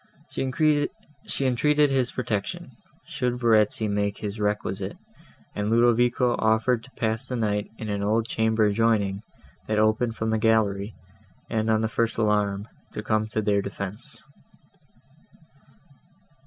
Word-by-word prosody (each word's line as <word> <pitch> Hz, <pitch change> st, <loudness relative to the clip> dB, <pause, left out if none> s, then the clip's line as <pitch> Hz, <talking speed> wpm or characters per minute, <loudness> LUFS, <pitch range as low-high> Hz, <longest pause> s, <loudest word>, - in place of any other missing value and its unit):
She 145 Hz, 0 st, -1 dB
entreated 145 Hz, +3 st, +3 dB
his 130 Hz, -2 st, +1 dB
protection, 105 Hz, -6 st, -3 dB, 0.3 s
should 125 Hz, -1 st, -2 dB
Verezzi 110 Hz, -2 st, +3 dB
make 100 Hz, 0 st, -1 dB
this 105 Hz, 0 st, -5 dB
requisite; 105 Hz, -2 st, -2 dB, 0.6 s
and 105 Hz, 0 st, -2 dB
Ludovico 120 Hz, +1 st, +3 dB
offered 110 Hz, +2 st, +2 dB
to 130 Hz, -, -15 dB
pass 110 Hz, +3 st, -1 dB
the 125 Hz, -, -3 dB
night 105 Hz, -3 st, -1 dB
in 110 Hz, -, -6 dB
an 100 Hz, -1 st, -2 dB
old 110 Hz, +3 st, +1 dB
chamber, 110 Hz, -1 st, +2 dB
adjoining, 105 Hz, -2 st, +1 dB, 0.5 s
that 110 Hz, -, 0 dB
opened 110 Hz, +2 st, +2 dB
from 110 Hz, 0 st, -2 dB
the 110 Hz, -, +1 dB
gallery, 105 Hz, -2 st, +1 dB, 0.6 s
and, 110 Hz, -1 st, 0 dB
on 110 Hz, 0 st, +3 dB
the 110 Hz, -, +1 dB
first 115 Hz, 0 st, -1 dB
alarm, 105 Hz, -2 st, +1 dB, 0.3 s
to 105 Hz, -, -5 dB
come 110 Hz, 0 st, 0 dB
to 110 Hz, 0 st, -2 dB
their 100 Hz, -1 st, +2 dB
defence. 100 Hz, +7 st, -7 dB
110 Hz, 130 wpm, -25 LUFS, 105-120 Hz, 0.6 s, entreated